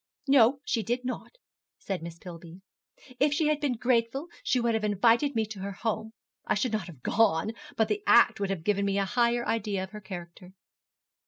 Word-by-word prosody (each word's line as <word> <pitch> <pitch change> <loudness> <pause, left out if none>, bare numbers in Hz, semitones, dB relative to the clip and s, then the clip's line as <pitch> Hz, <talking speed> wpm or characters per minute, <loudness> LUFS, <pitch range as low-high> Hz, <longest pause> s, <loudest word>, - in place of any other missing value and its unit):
'No, 270 0 +5
she 230 - 0
did 240 +3 -2
not,' 255 - -5 0.4
said 190 -4 -4
Miss 170 0 -8
Pillby. 170 0 -11 0.6
'If 290 +2 +3
she 310 0 +2
had 305 -1 +1
been 275 -4 0
grateful 245 +6 0
she 255 - +1
would 235 -1 +1
have 220 -1 -1
invited 230 +7 +3
me 220 -1 +1
to 210 -2 -9
her 200 +1 -5
home. 220 +3 -3 0.3
I - - 0
should 220 +4 0
not 215 -5 -2
have 150 -8 -13
gone, 210 -2 +2 0.3
but 220 - +3
the 210 -1 -1
act 205 - +6
would 200 -1 -1
have 190 -5 -3
given 200 +2 +1
me 200 0 0
a 200 - +1
higher 240 +2 +1
idea 205 -4 -1
of 190 - -8
her 210 - -9
character.' 180 -1 -9
215 Hz, 200 wpm, -28 LUFS, 190-240 Hz, 0.6 s, act